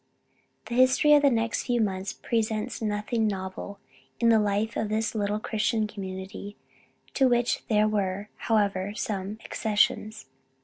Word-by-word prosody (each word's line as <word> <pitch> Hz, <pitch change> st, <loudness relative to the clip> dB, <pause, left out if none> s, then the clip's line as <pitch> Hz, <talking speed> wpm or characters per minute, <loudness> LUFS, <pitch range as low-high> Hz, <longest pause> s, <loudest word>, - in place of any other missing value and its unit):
The -, -, -6 dB
history 260 Hz, +4 st, +5 dB
of 295 Hz, -, +7 dB
the 285 Hz, -, +5 dB
next 230 Hz, -2 st, 0 dB
few 245 Hz, -1 st, +1 dB
months 195 Hz, -3 st, -1 dB
presents 220 Hz, -2 st, -2 dB
nothing 215 Hz, +1 st, 0 dB
novel 190 Hz, 0 st, -5 dB, 0.4 s
in 235 Hz, -, +4 dB
the 225 Hz, -1 st, +6 dB
life 210 Hz, +2 st, 0 dB
of 215 Hz, -, -1 dB
this 220 Hz, +1 st, -1 dB
little 210 Hz, -1 st, -1 dB
Christian 220 Hz, 0 st, 0 dB
community, 195 Hz, 0 st, -7 dB, 0.6 s
to 265 Hz, -2 st, +4 dB
which 240 Hz, -1 st, +1 dB
there 215 Hz, -1 st, +3 dB
were 200 Hz, -1 st, -1 dB
however 205 Hz, -2 st, 0 dB
some 205 Hz, -3 st, -3 dB
accessions. 215 Hz, -, 0 dB
215 Hz, 140 wpm, -27 LUFS, 200-230 Hz, 0.6 s, of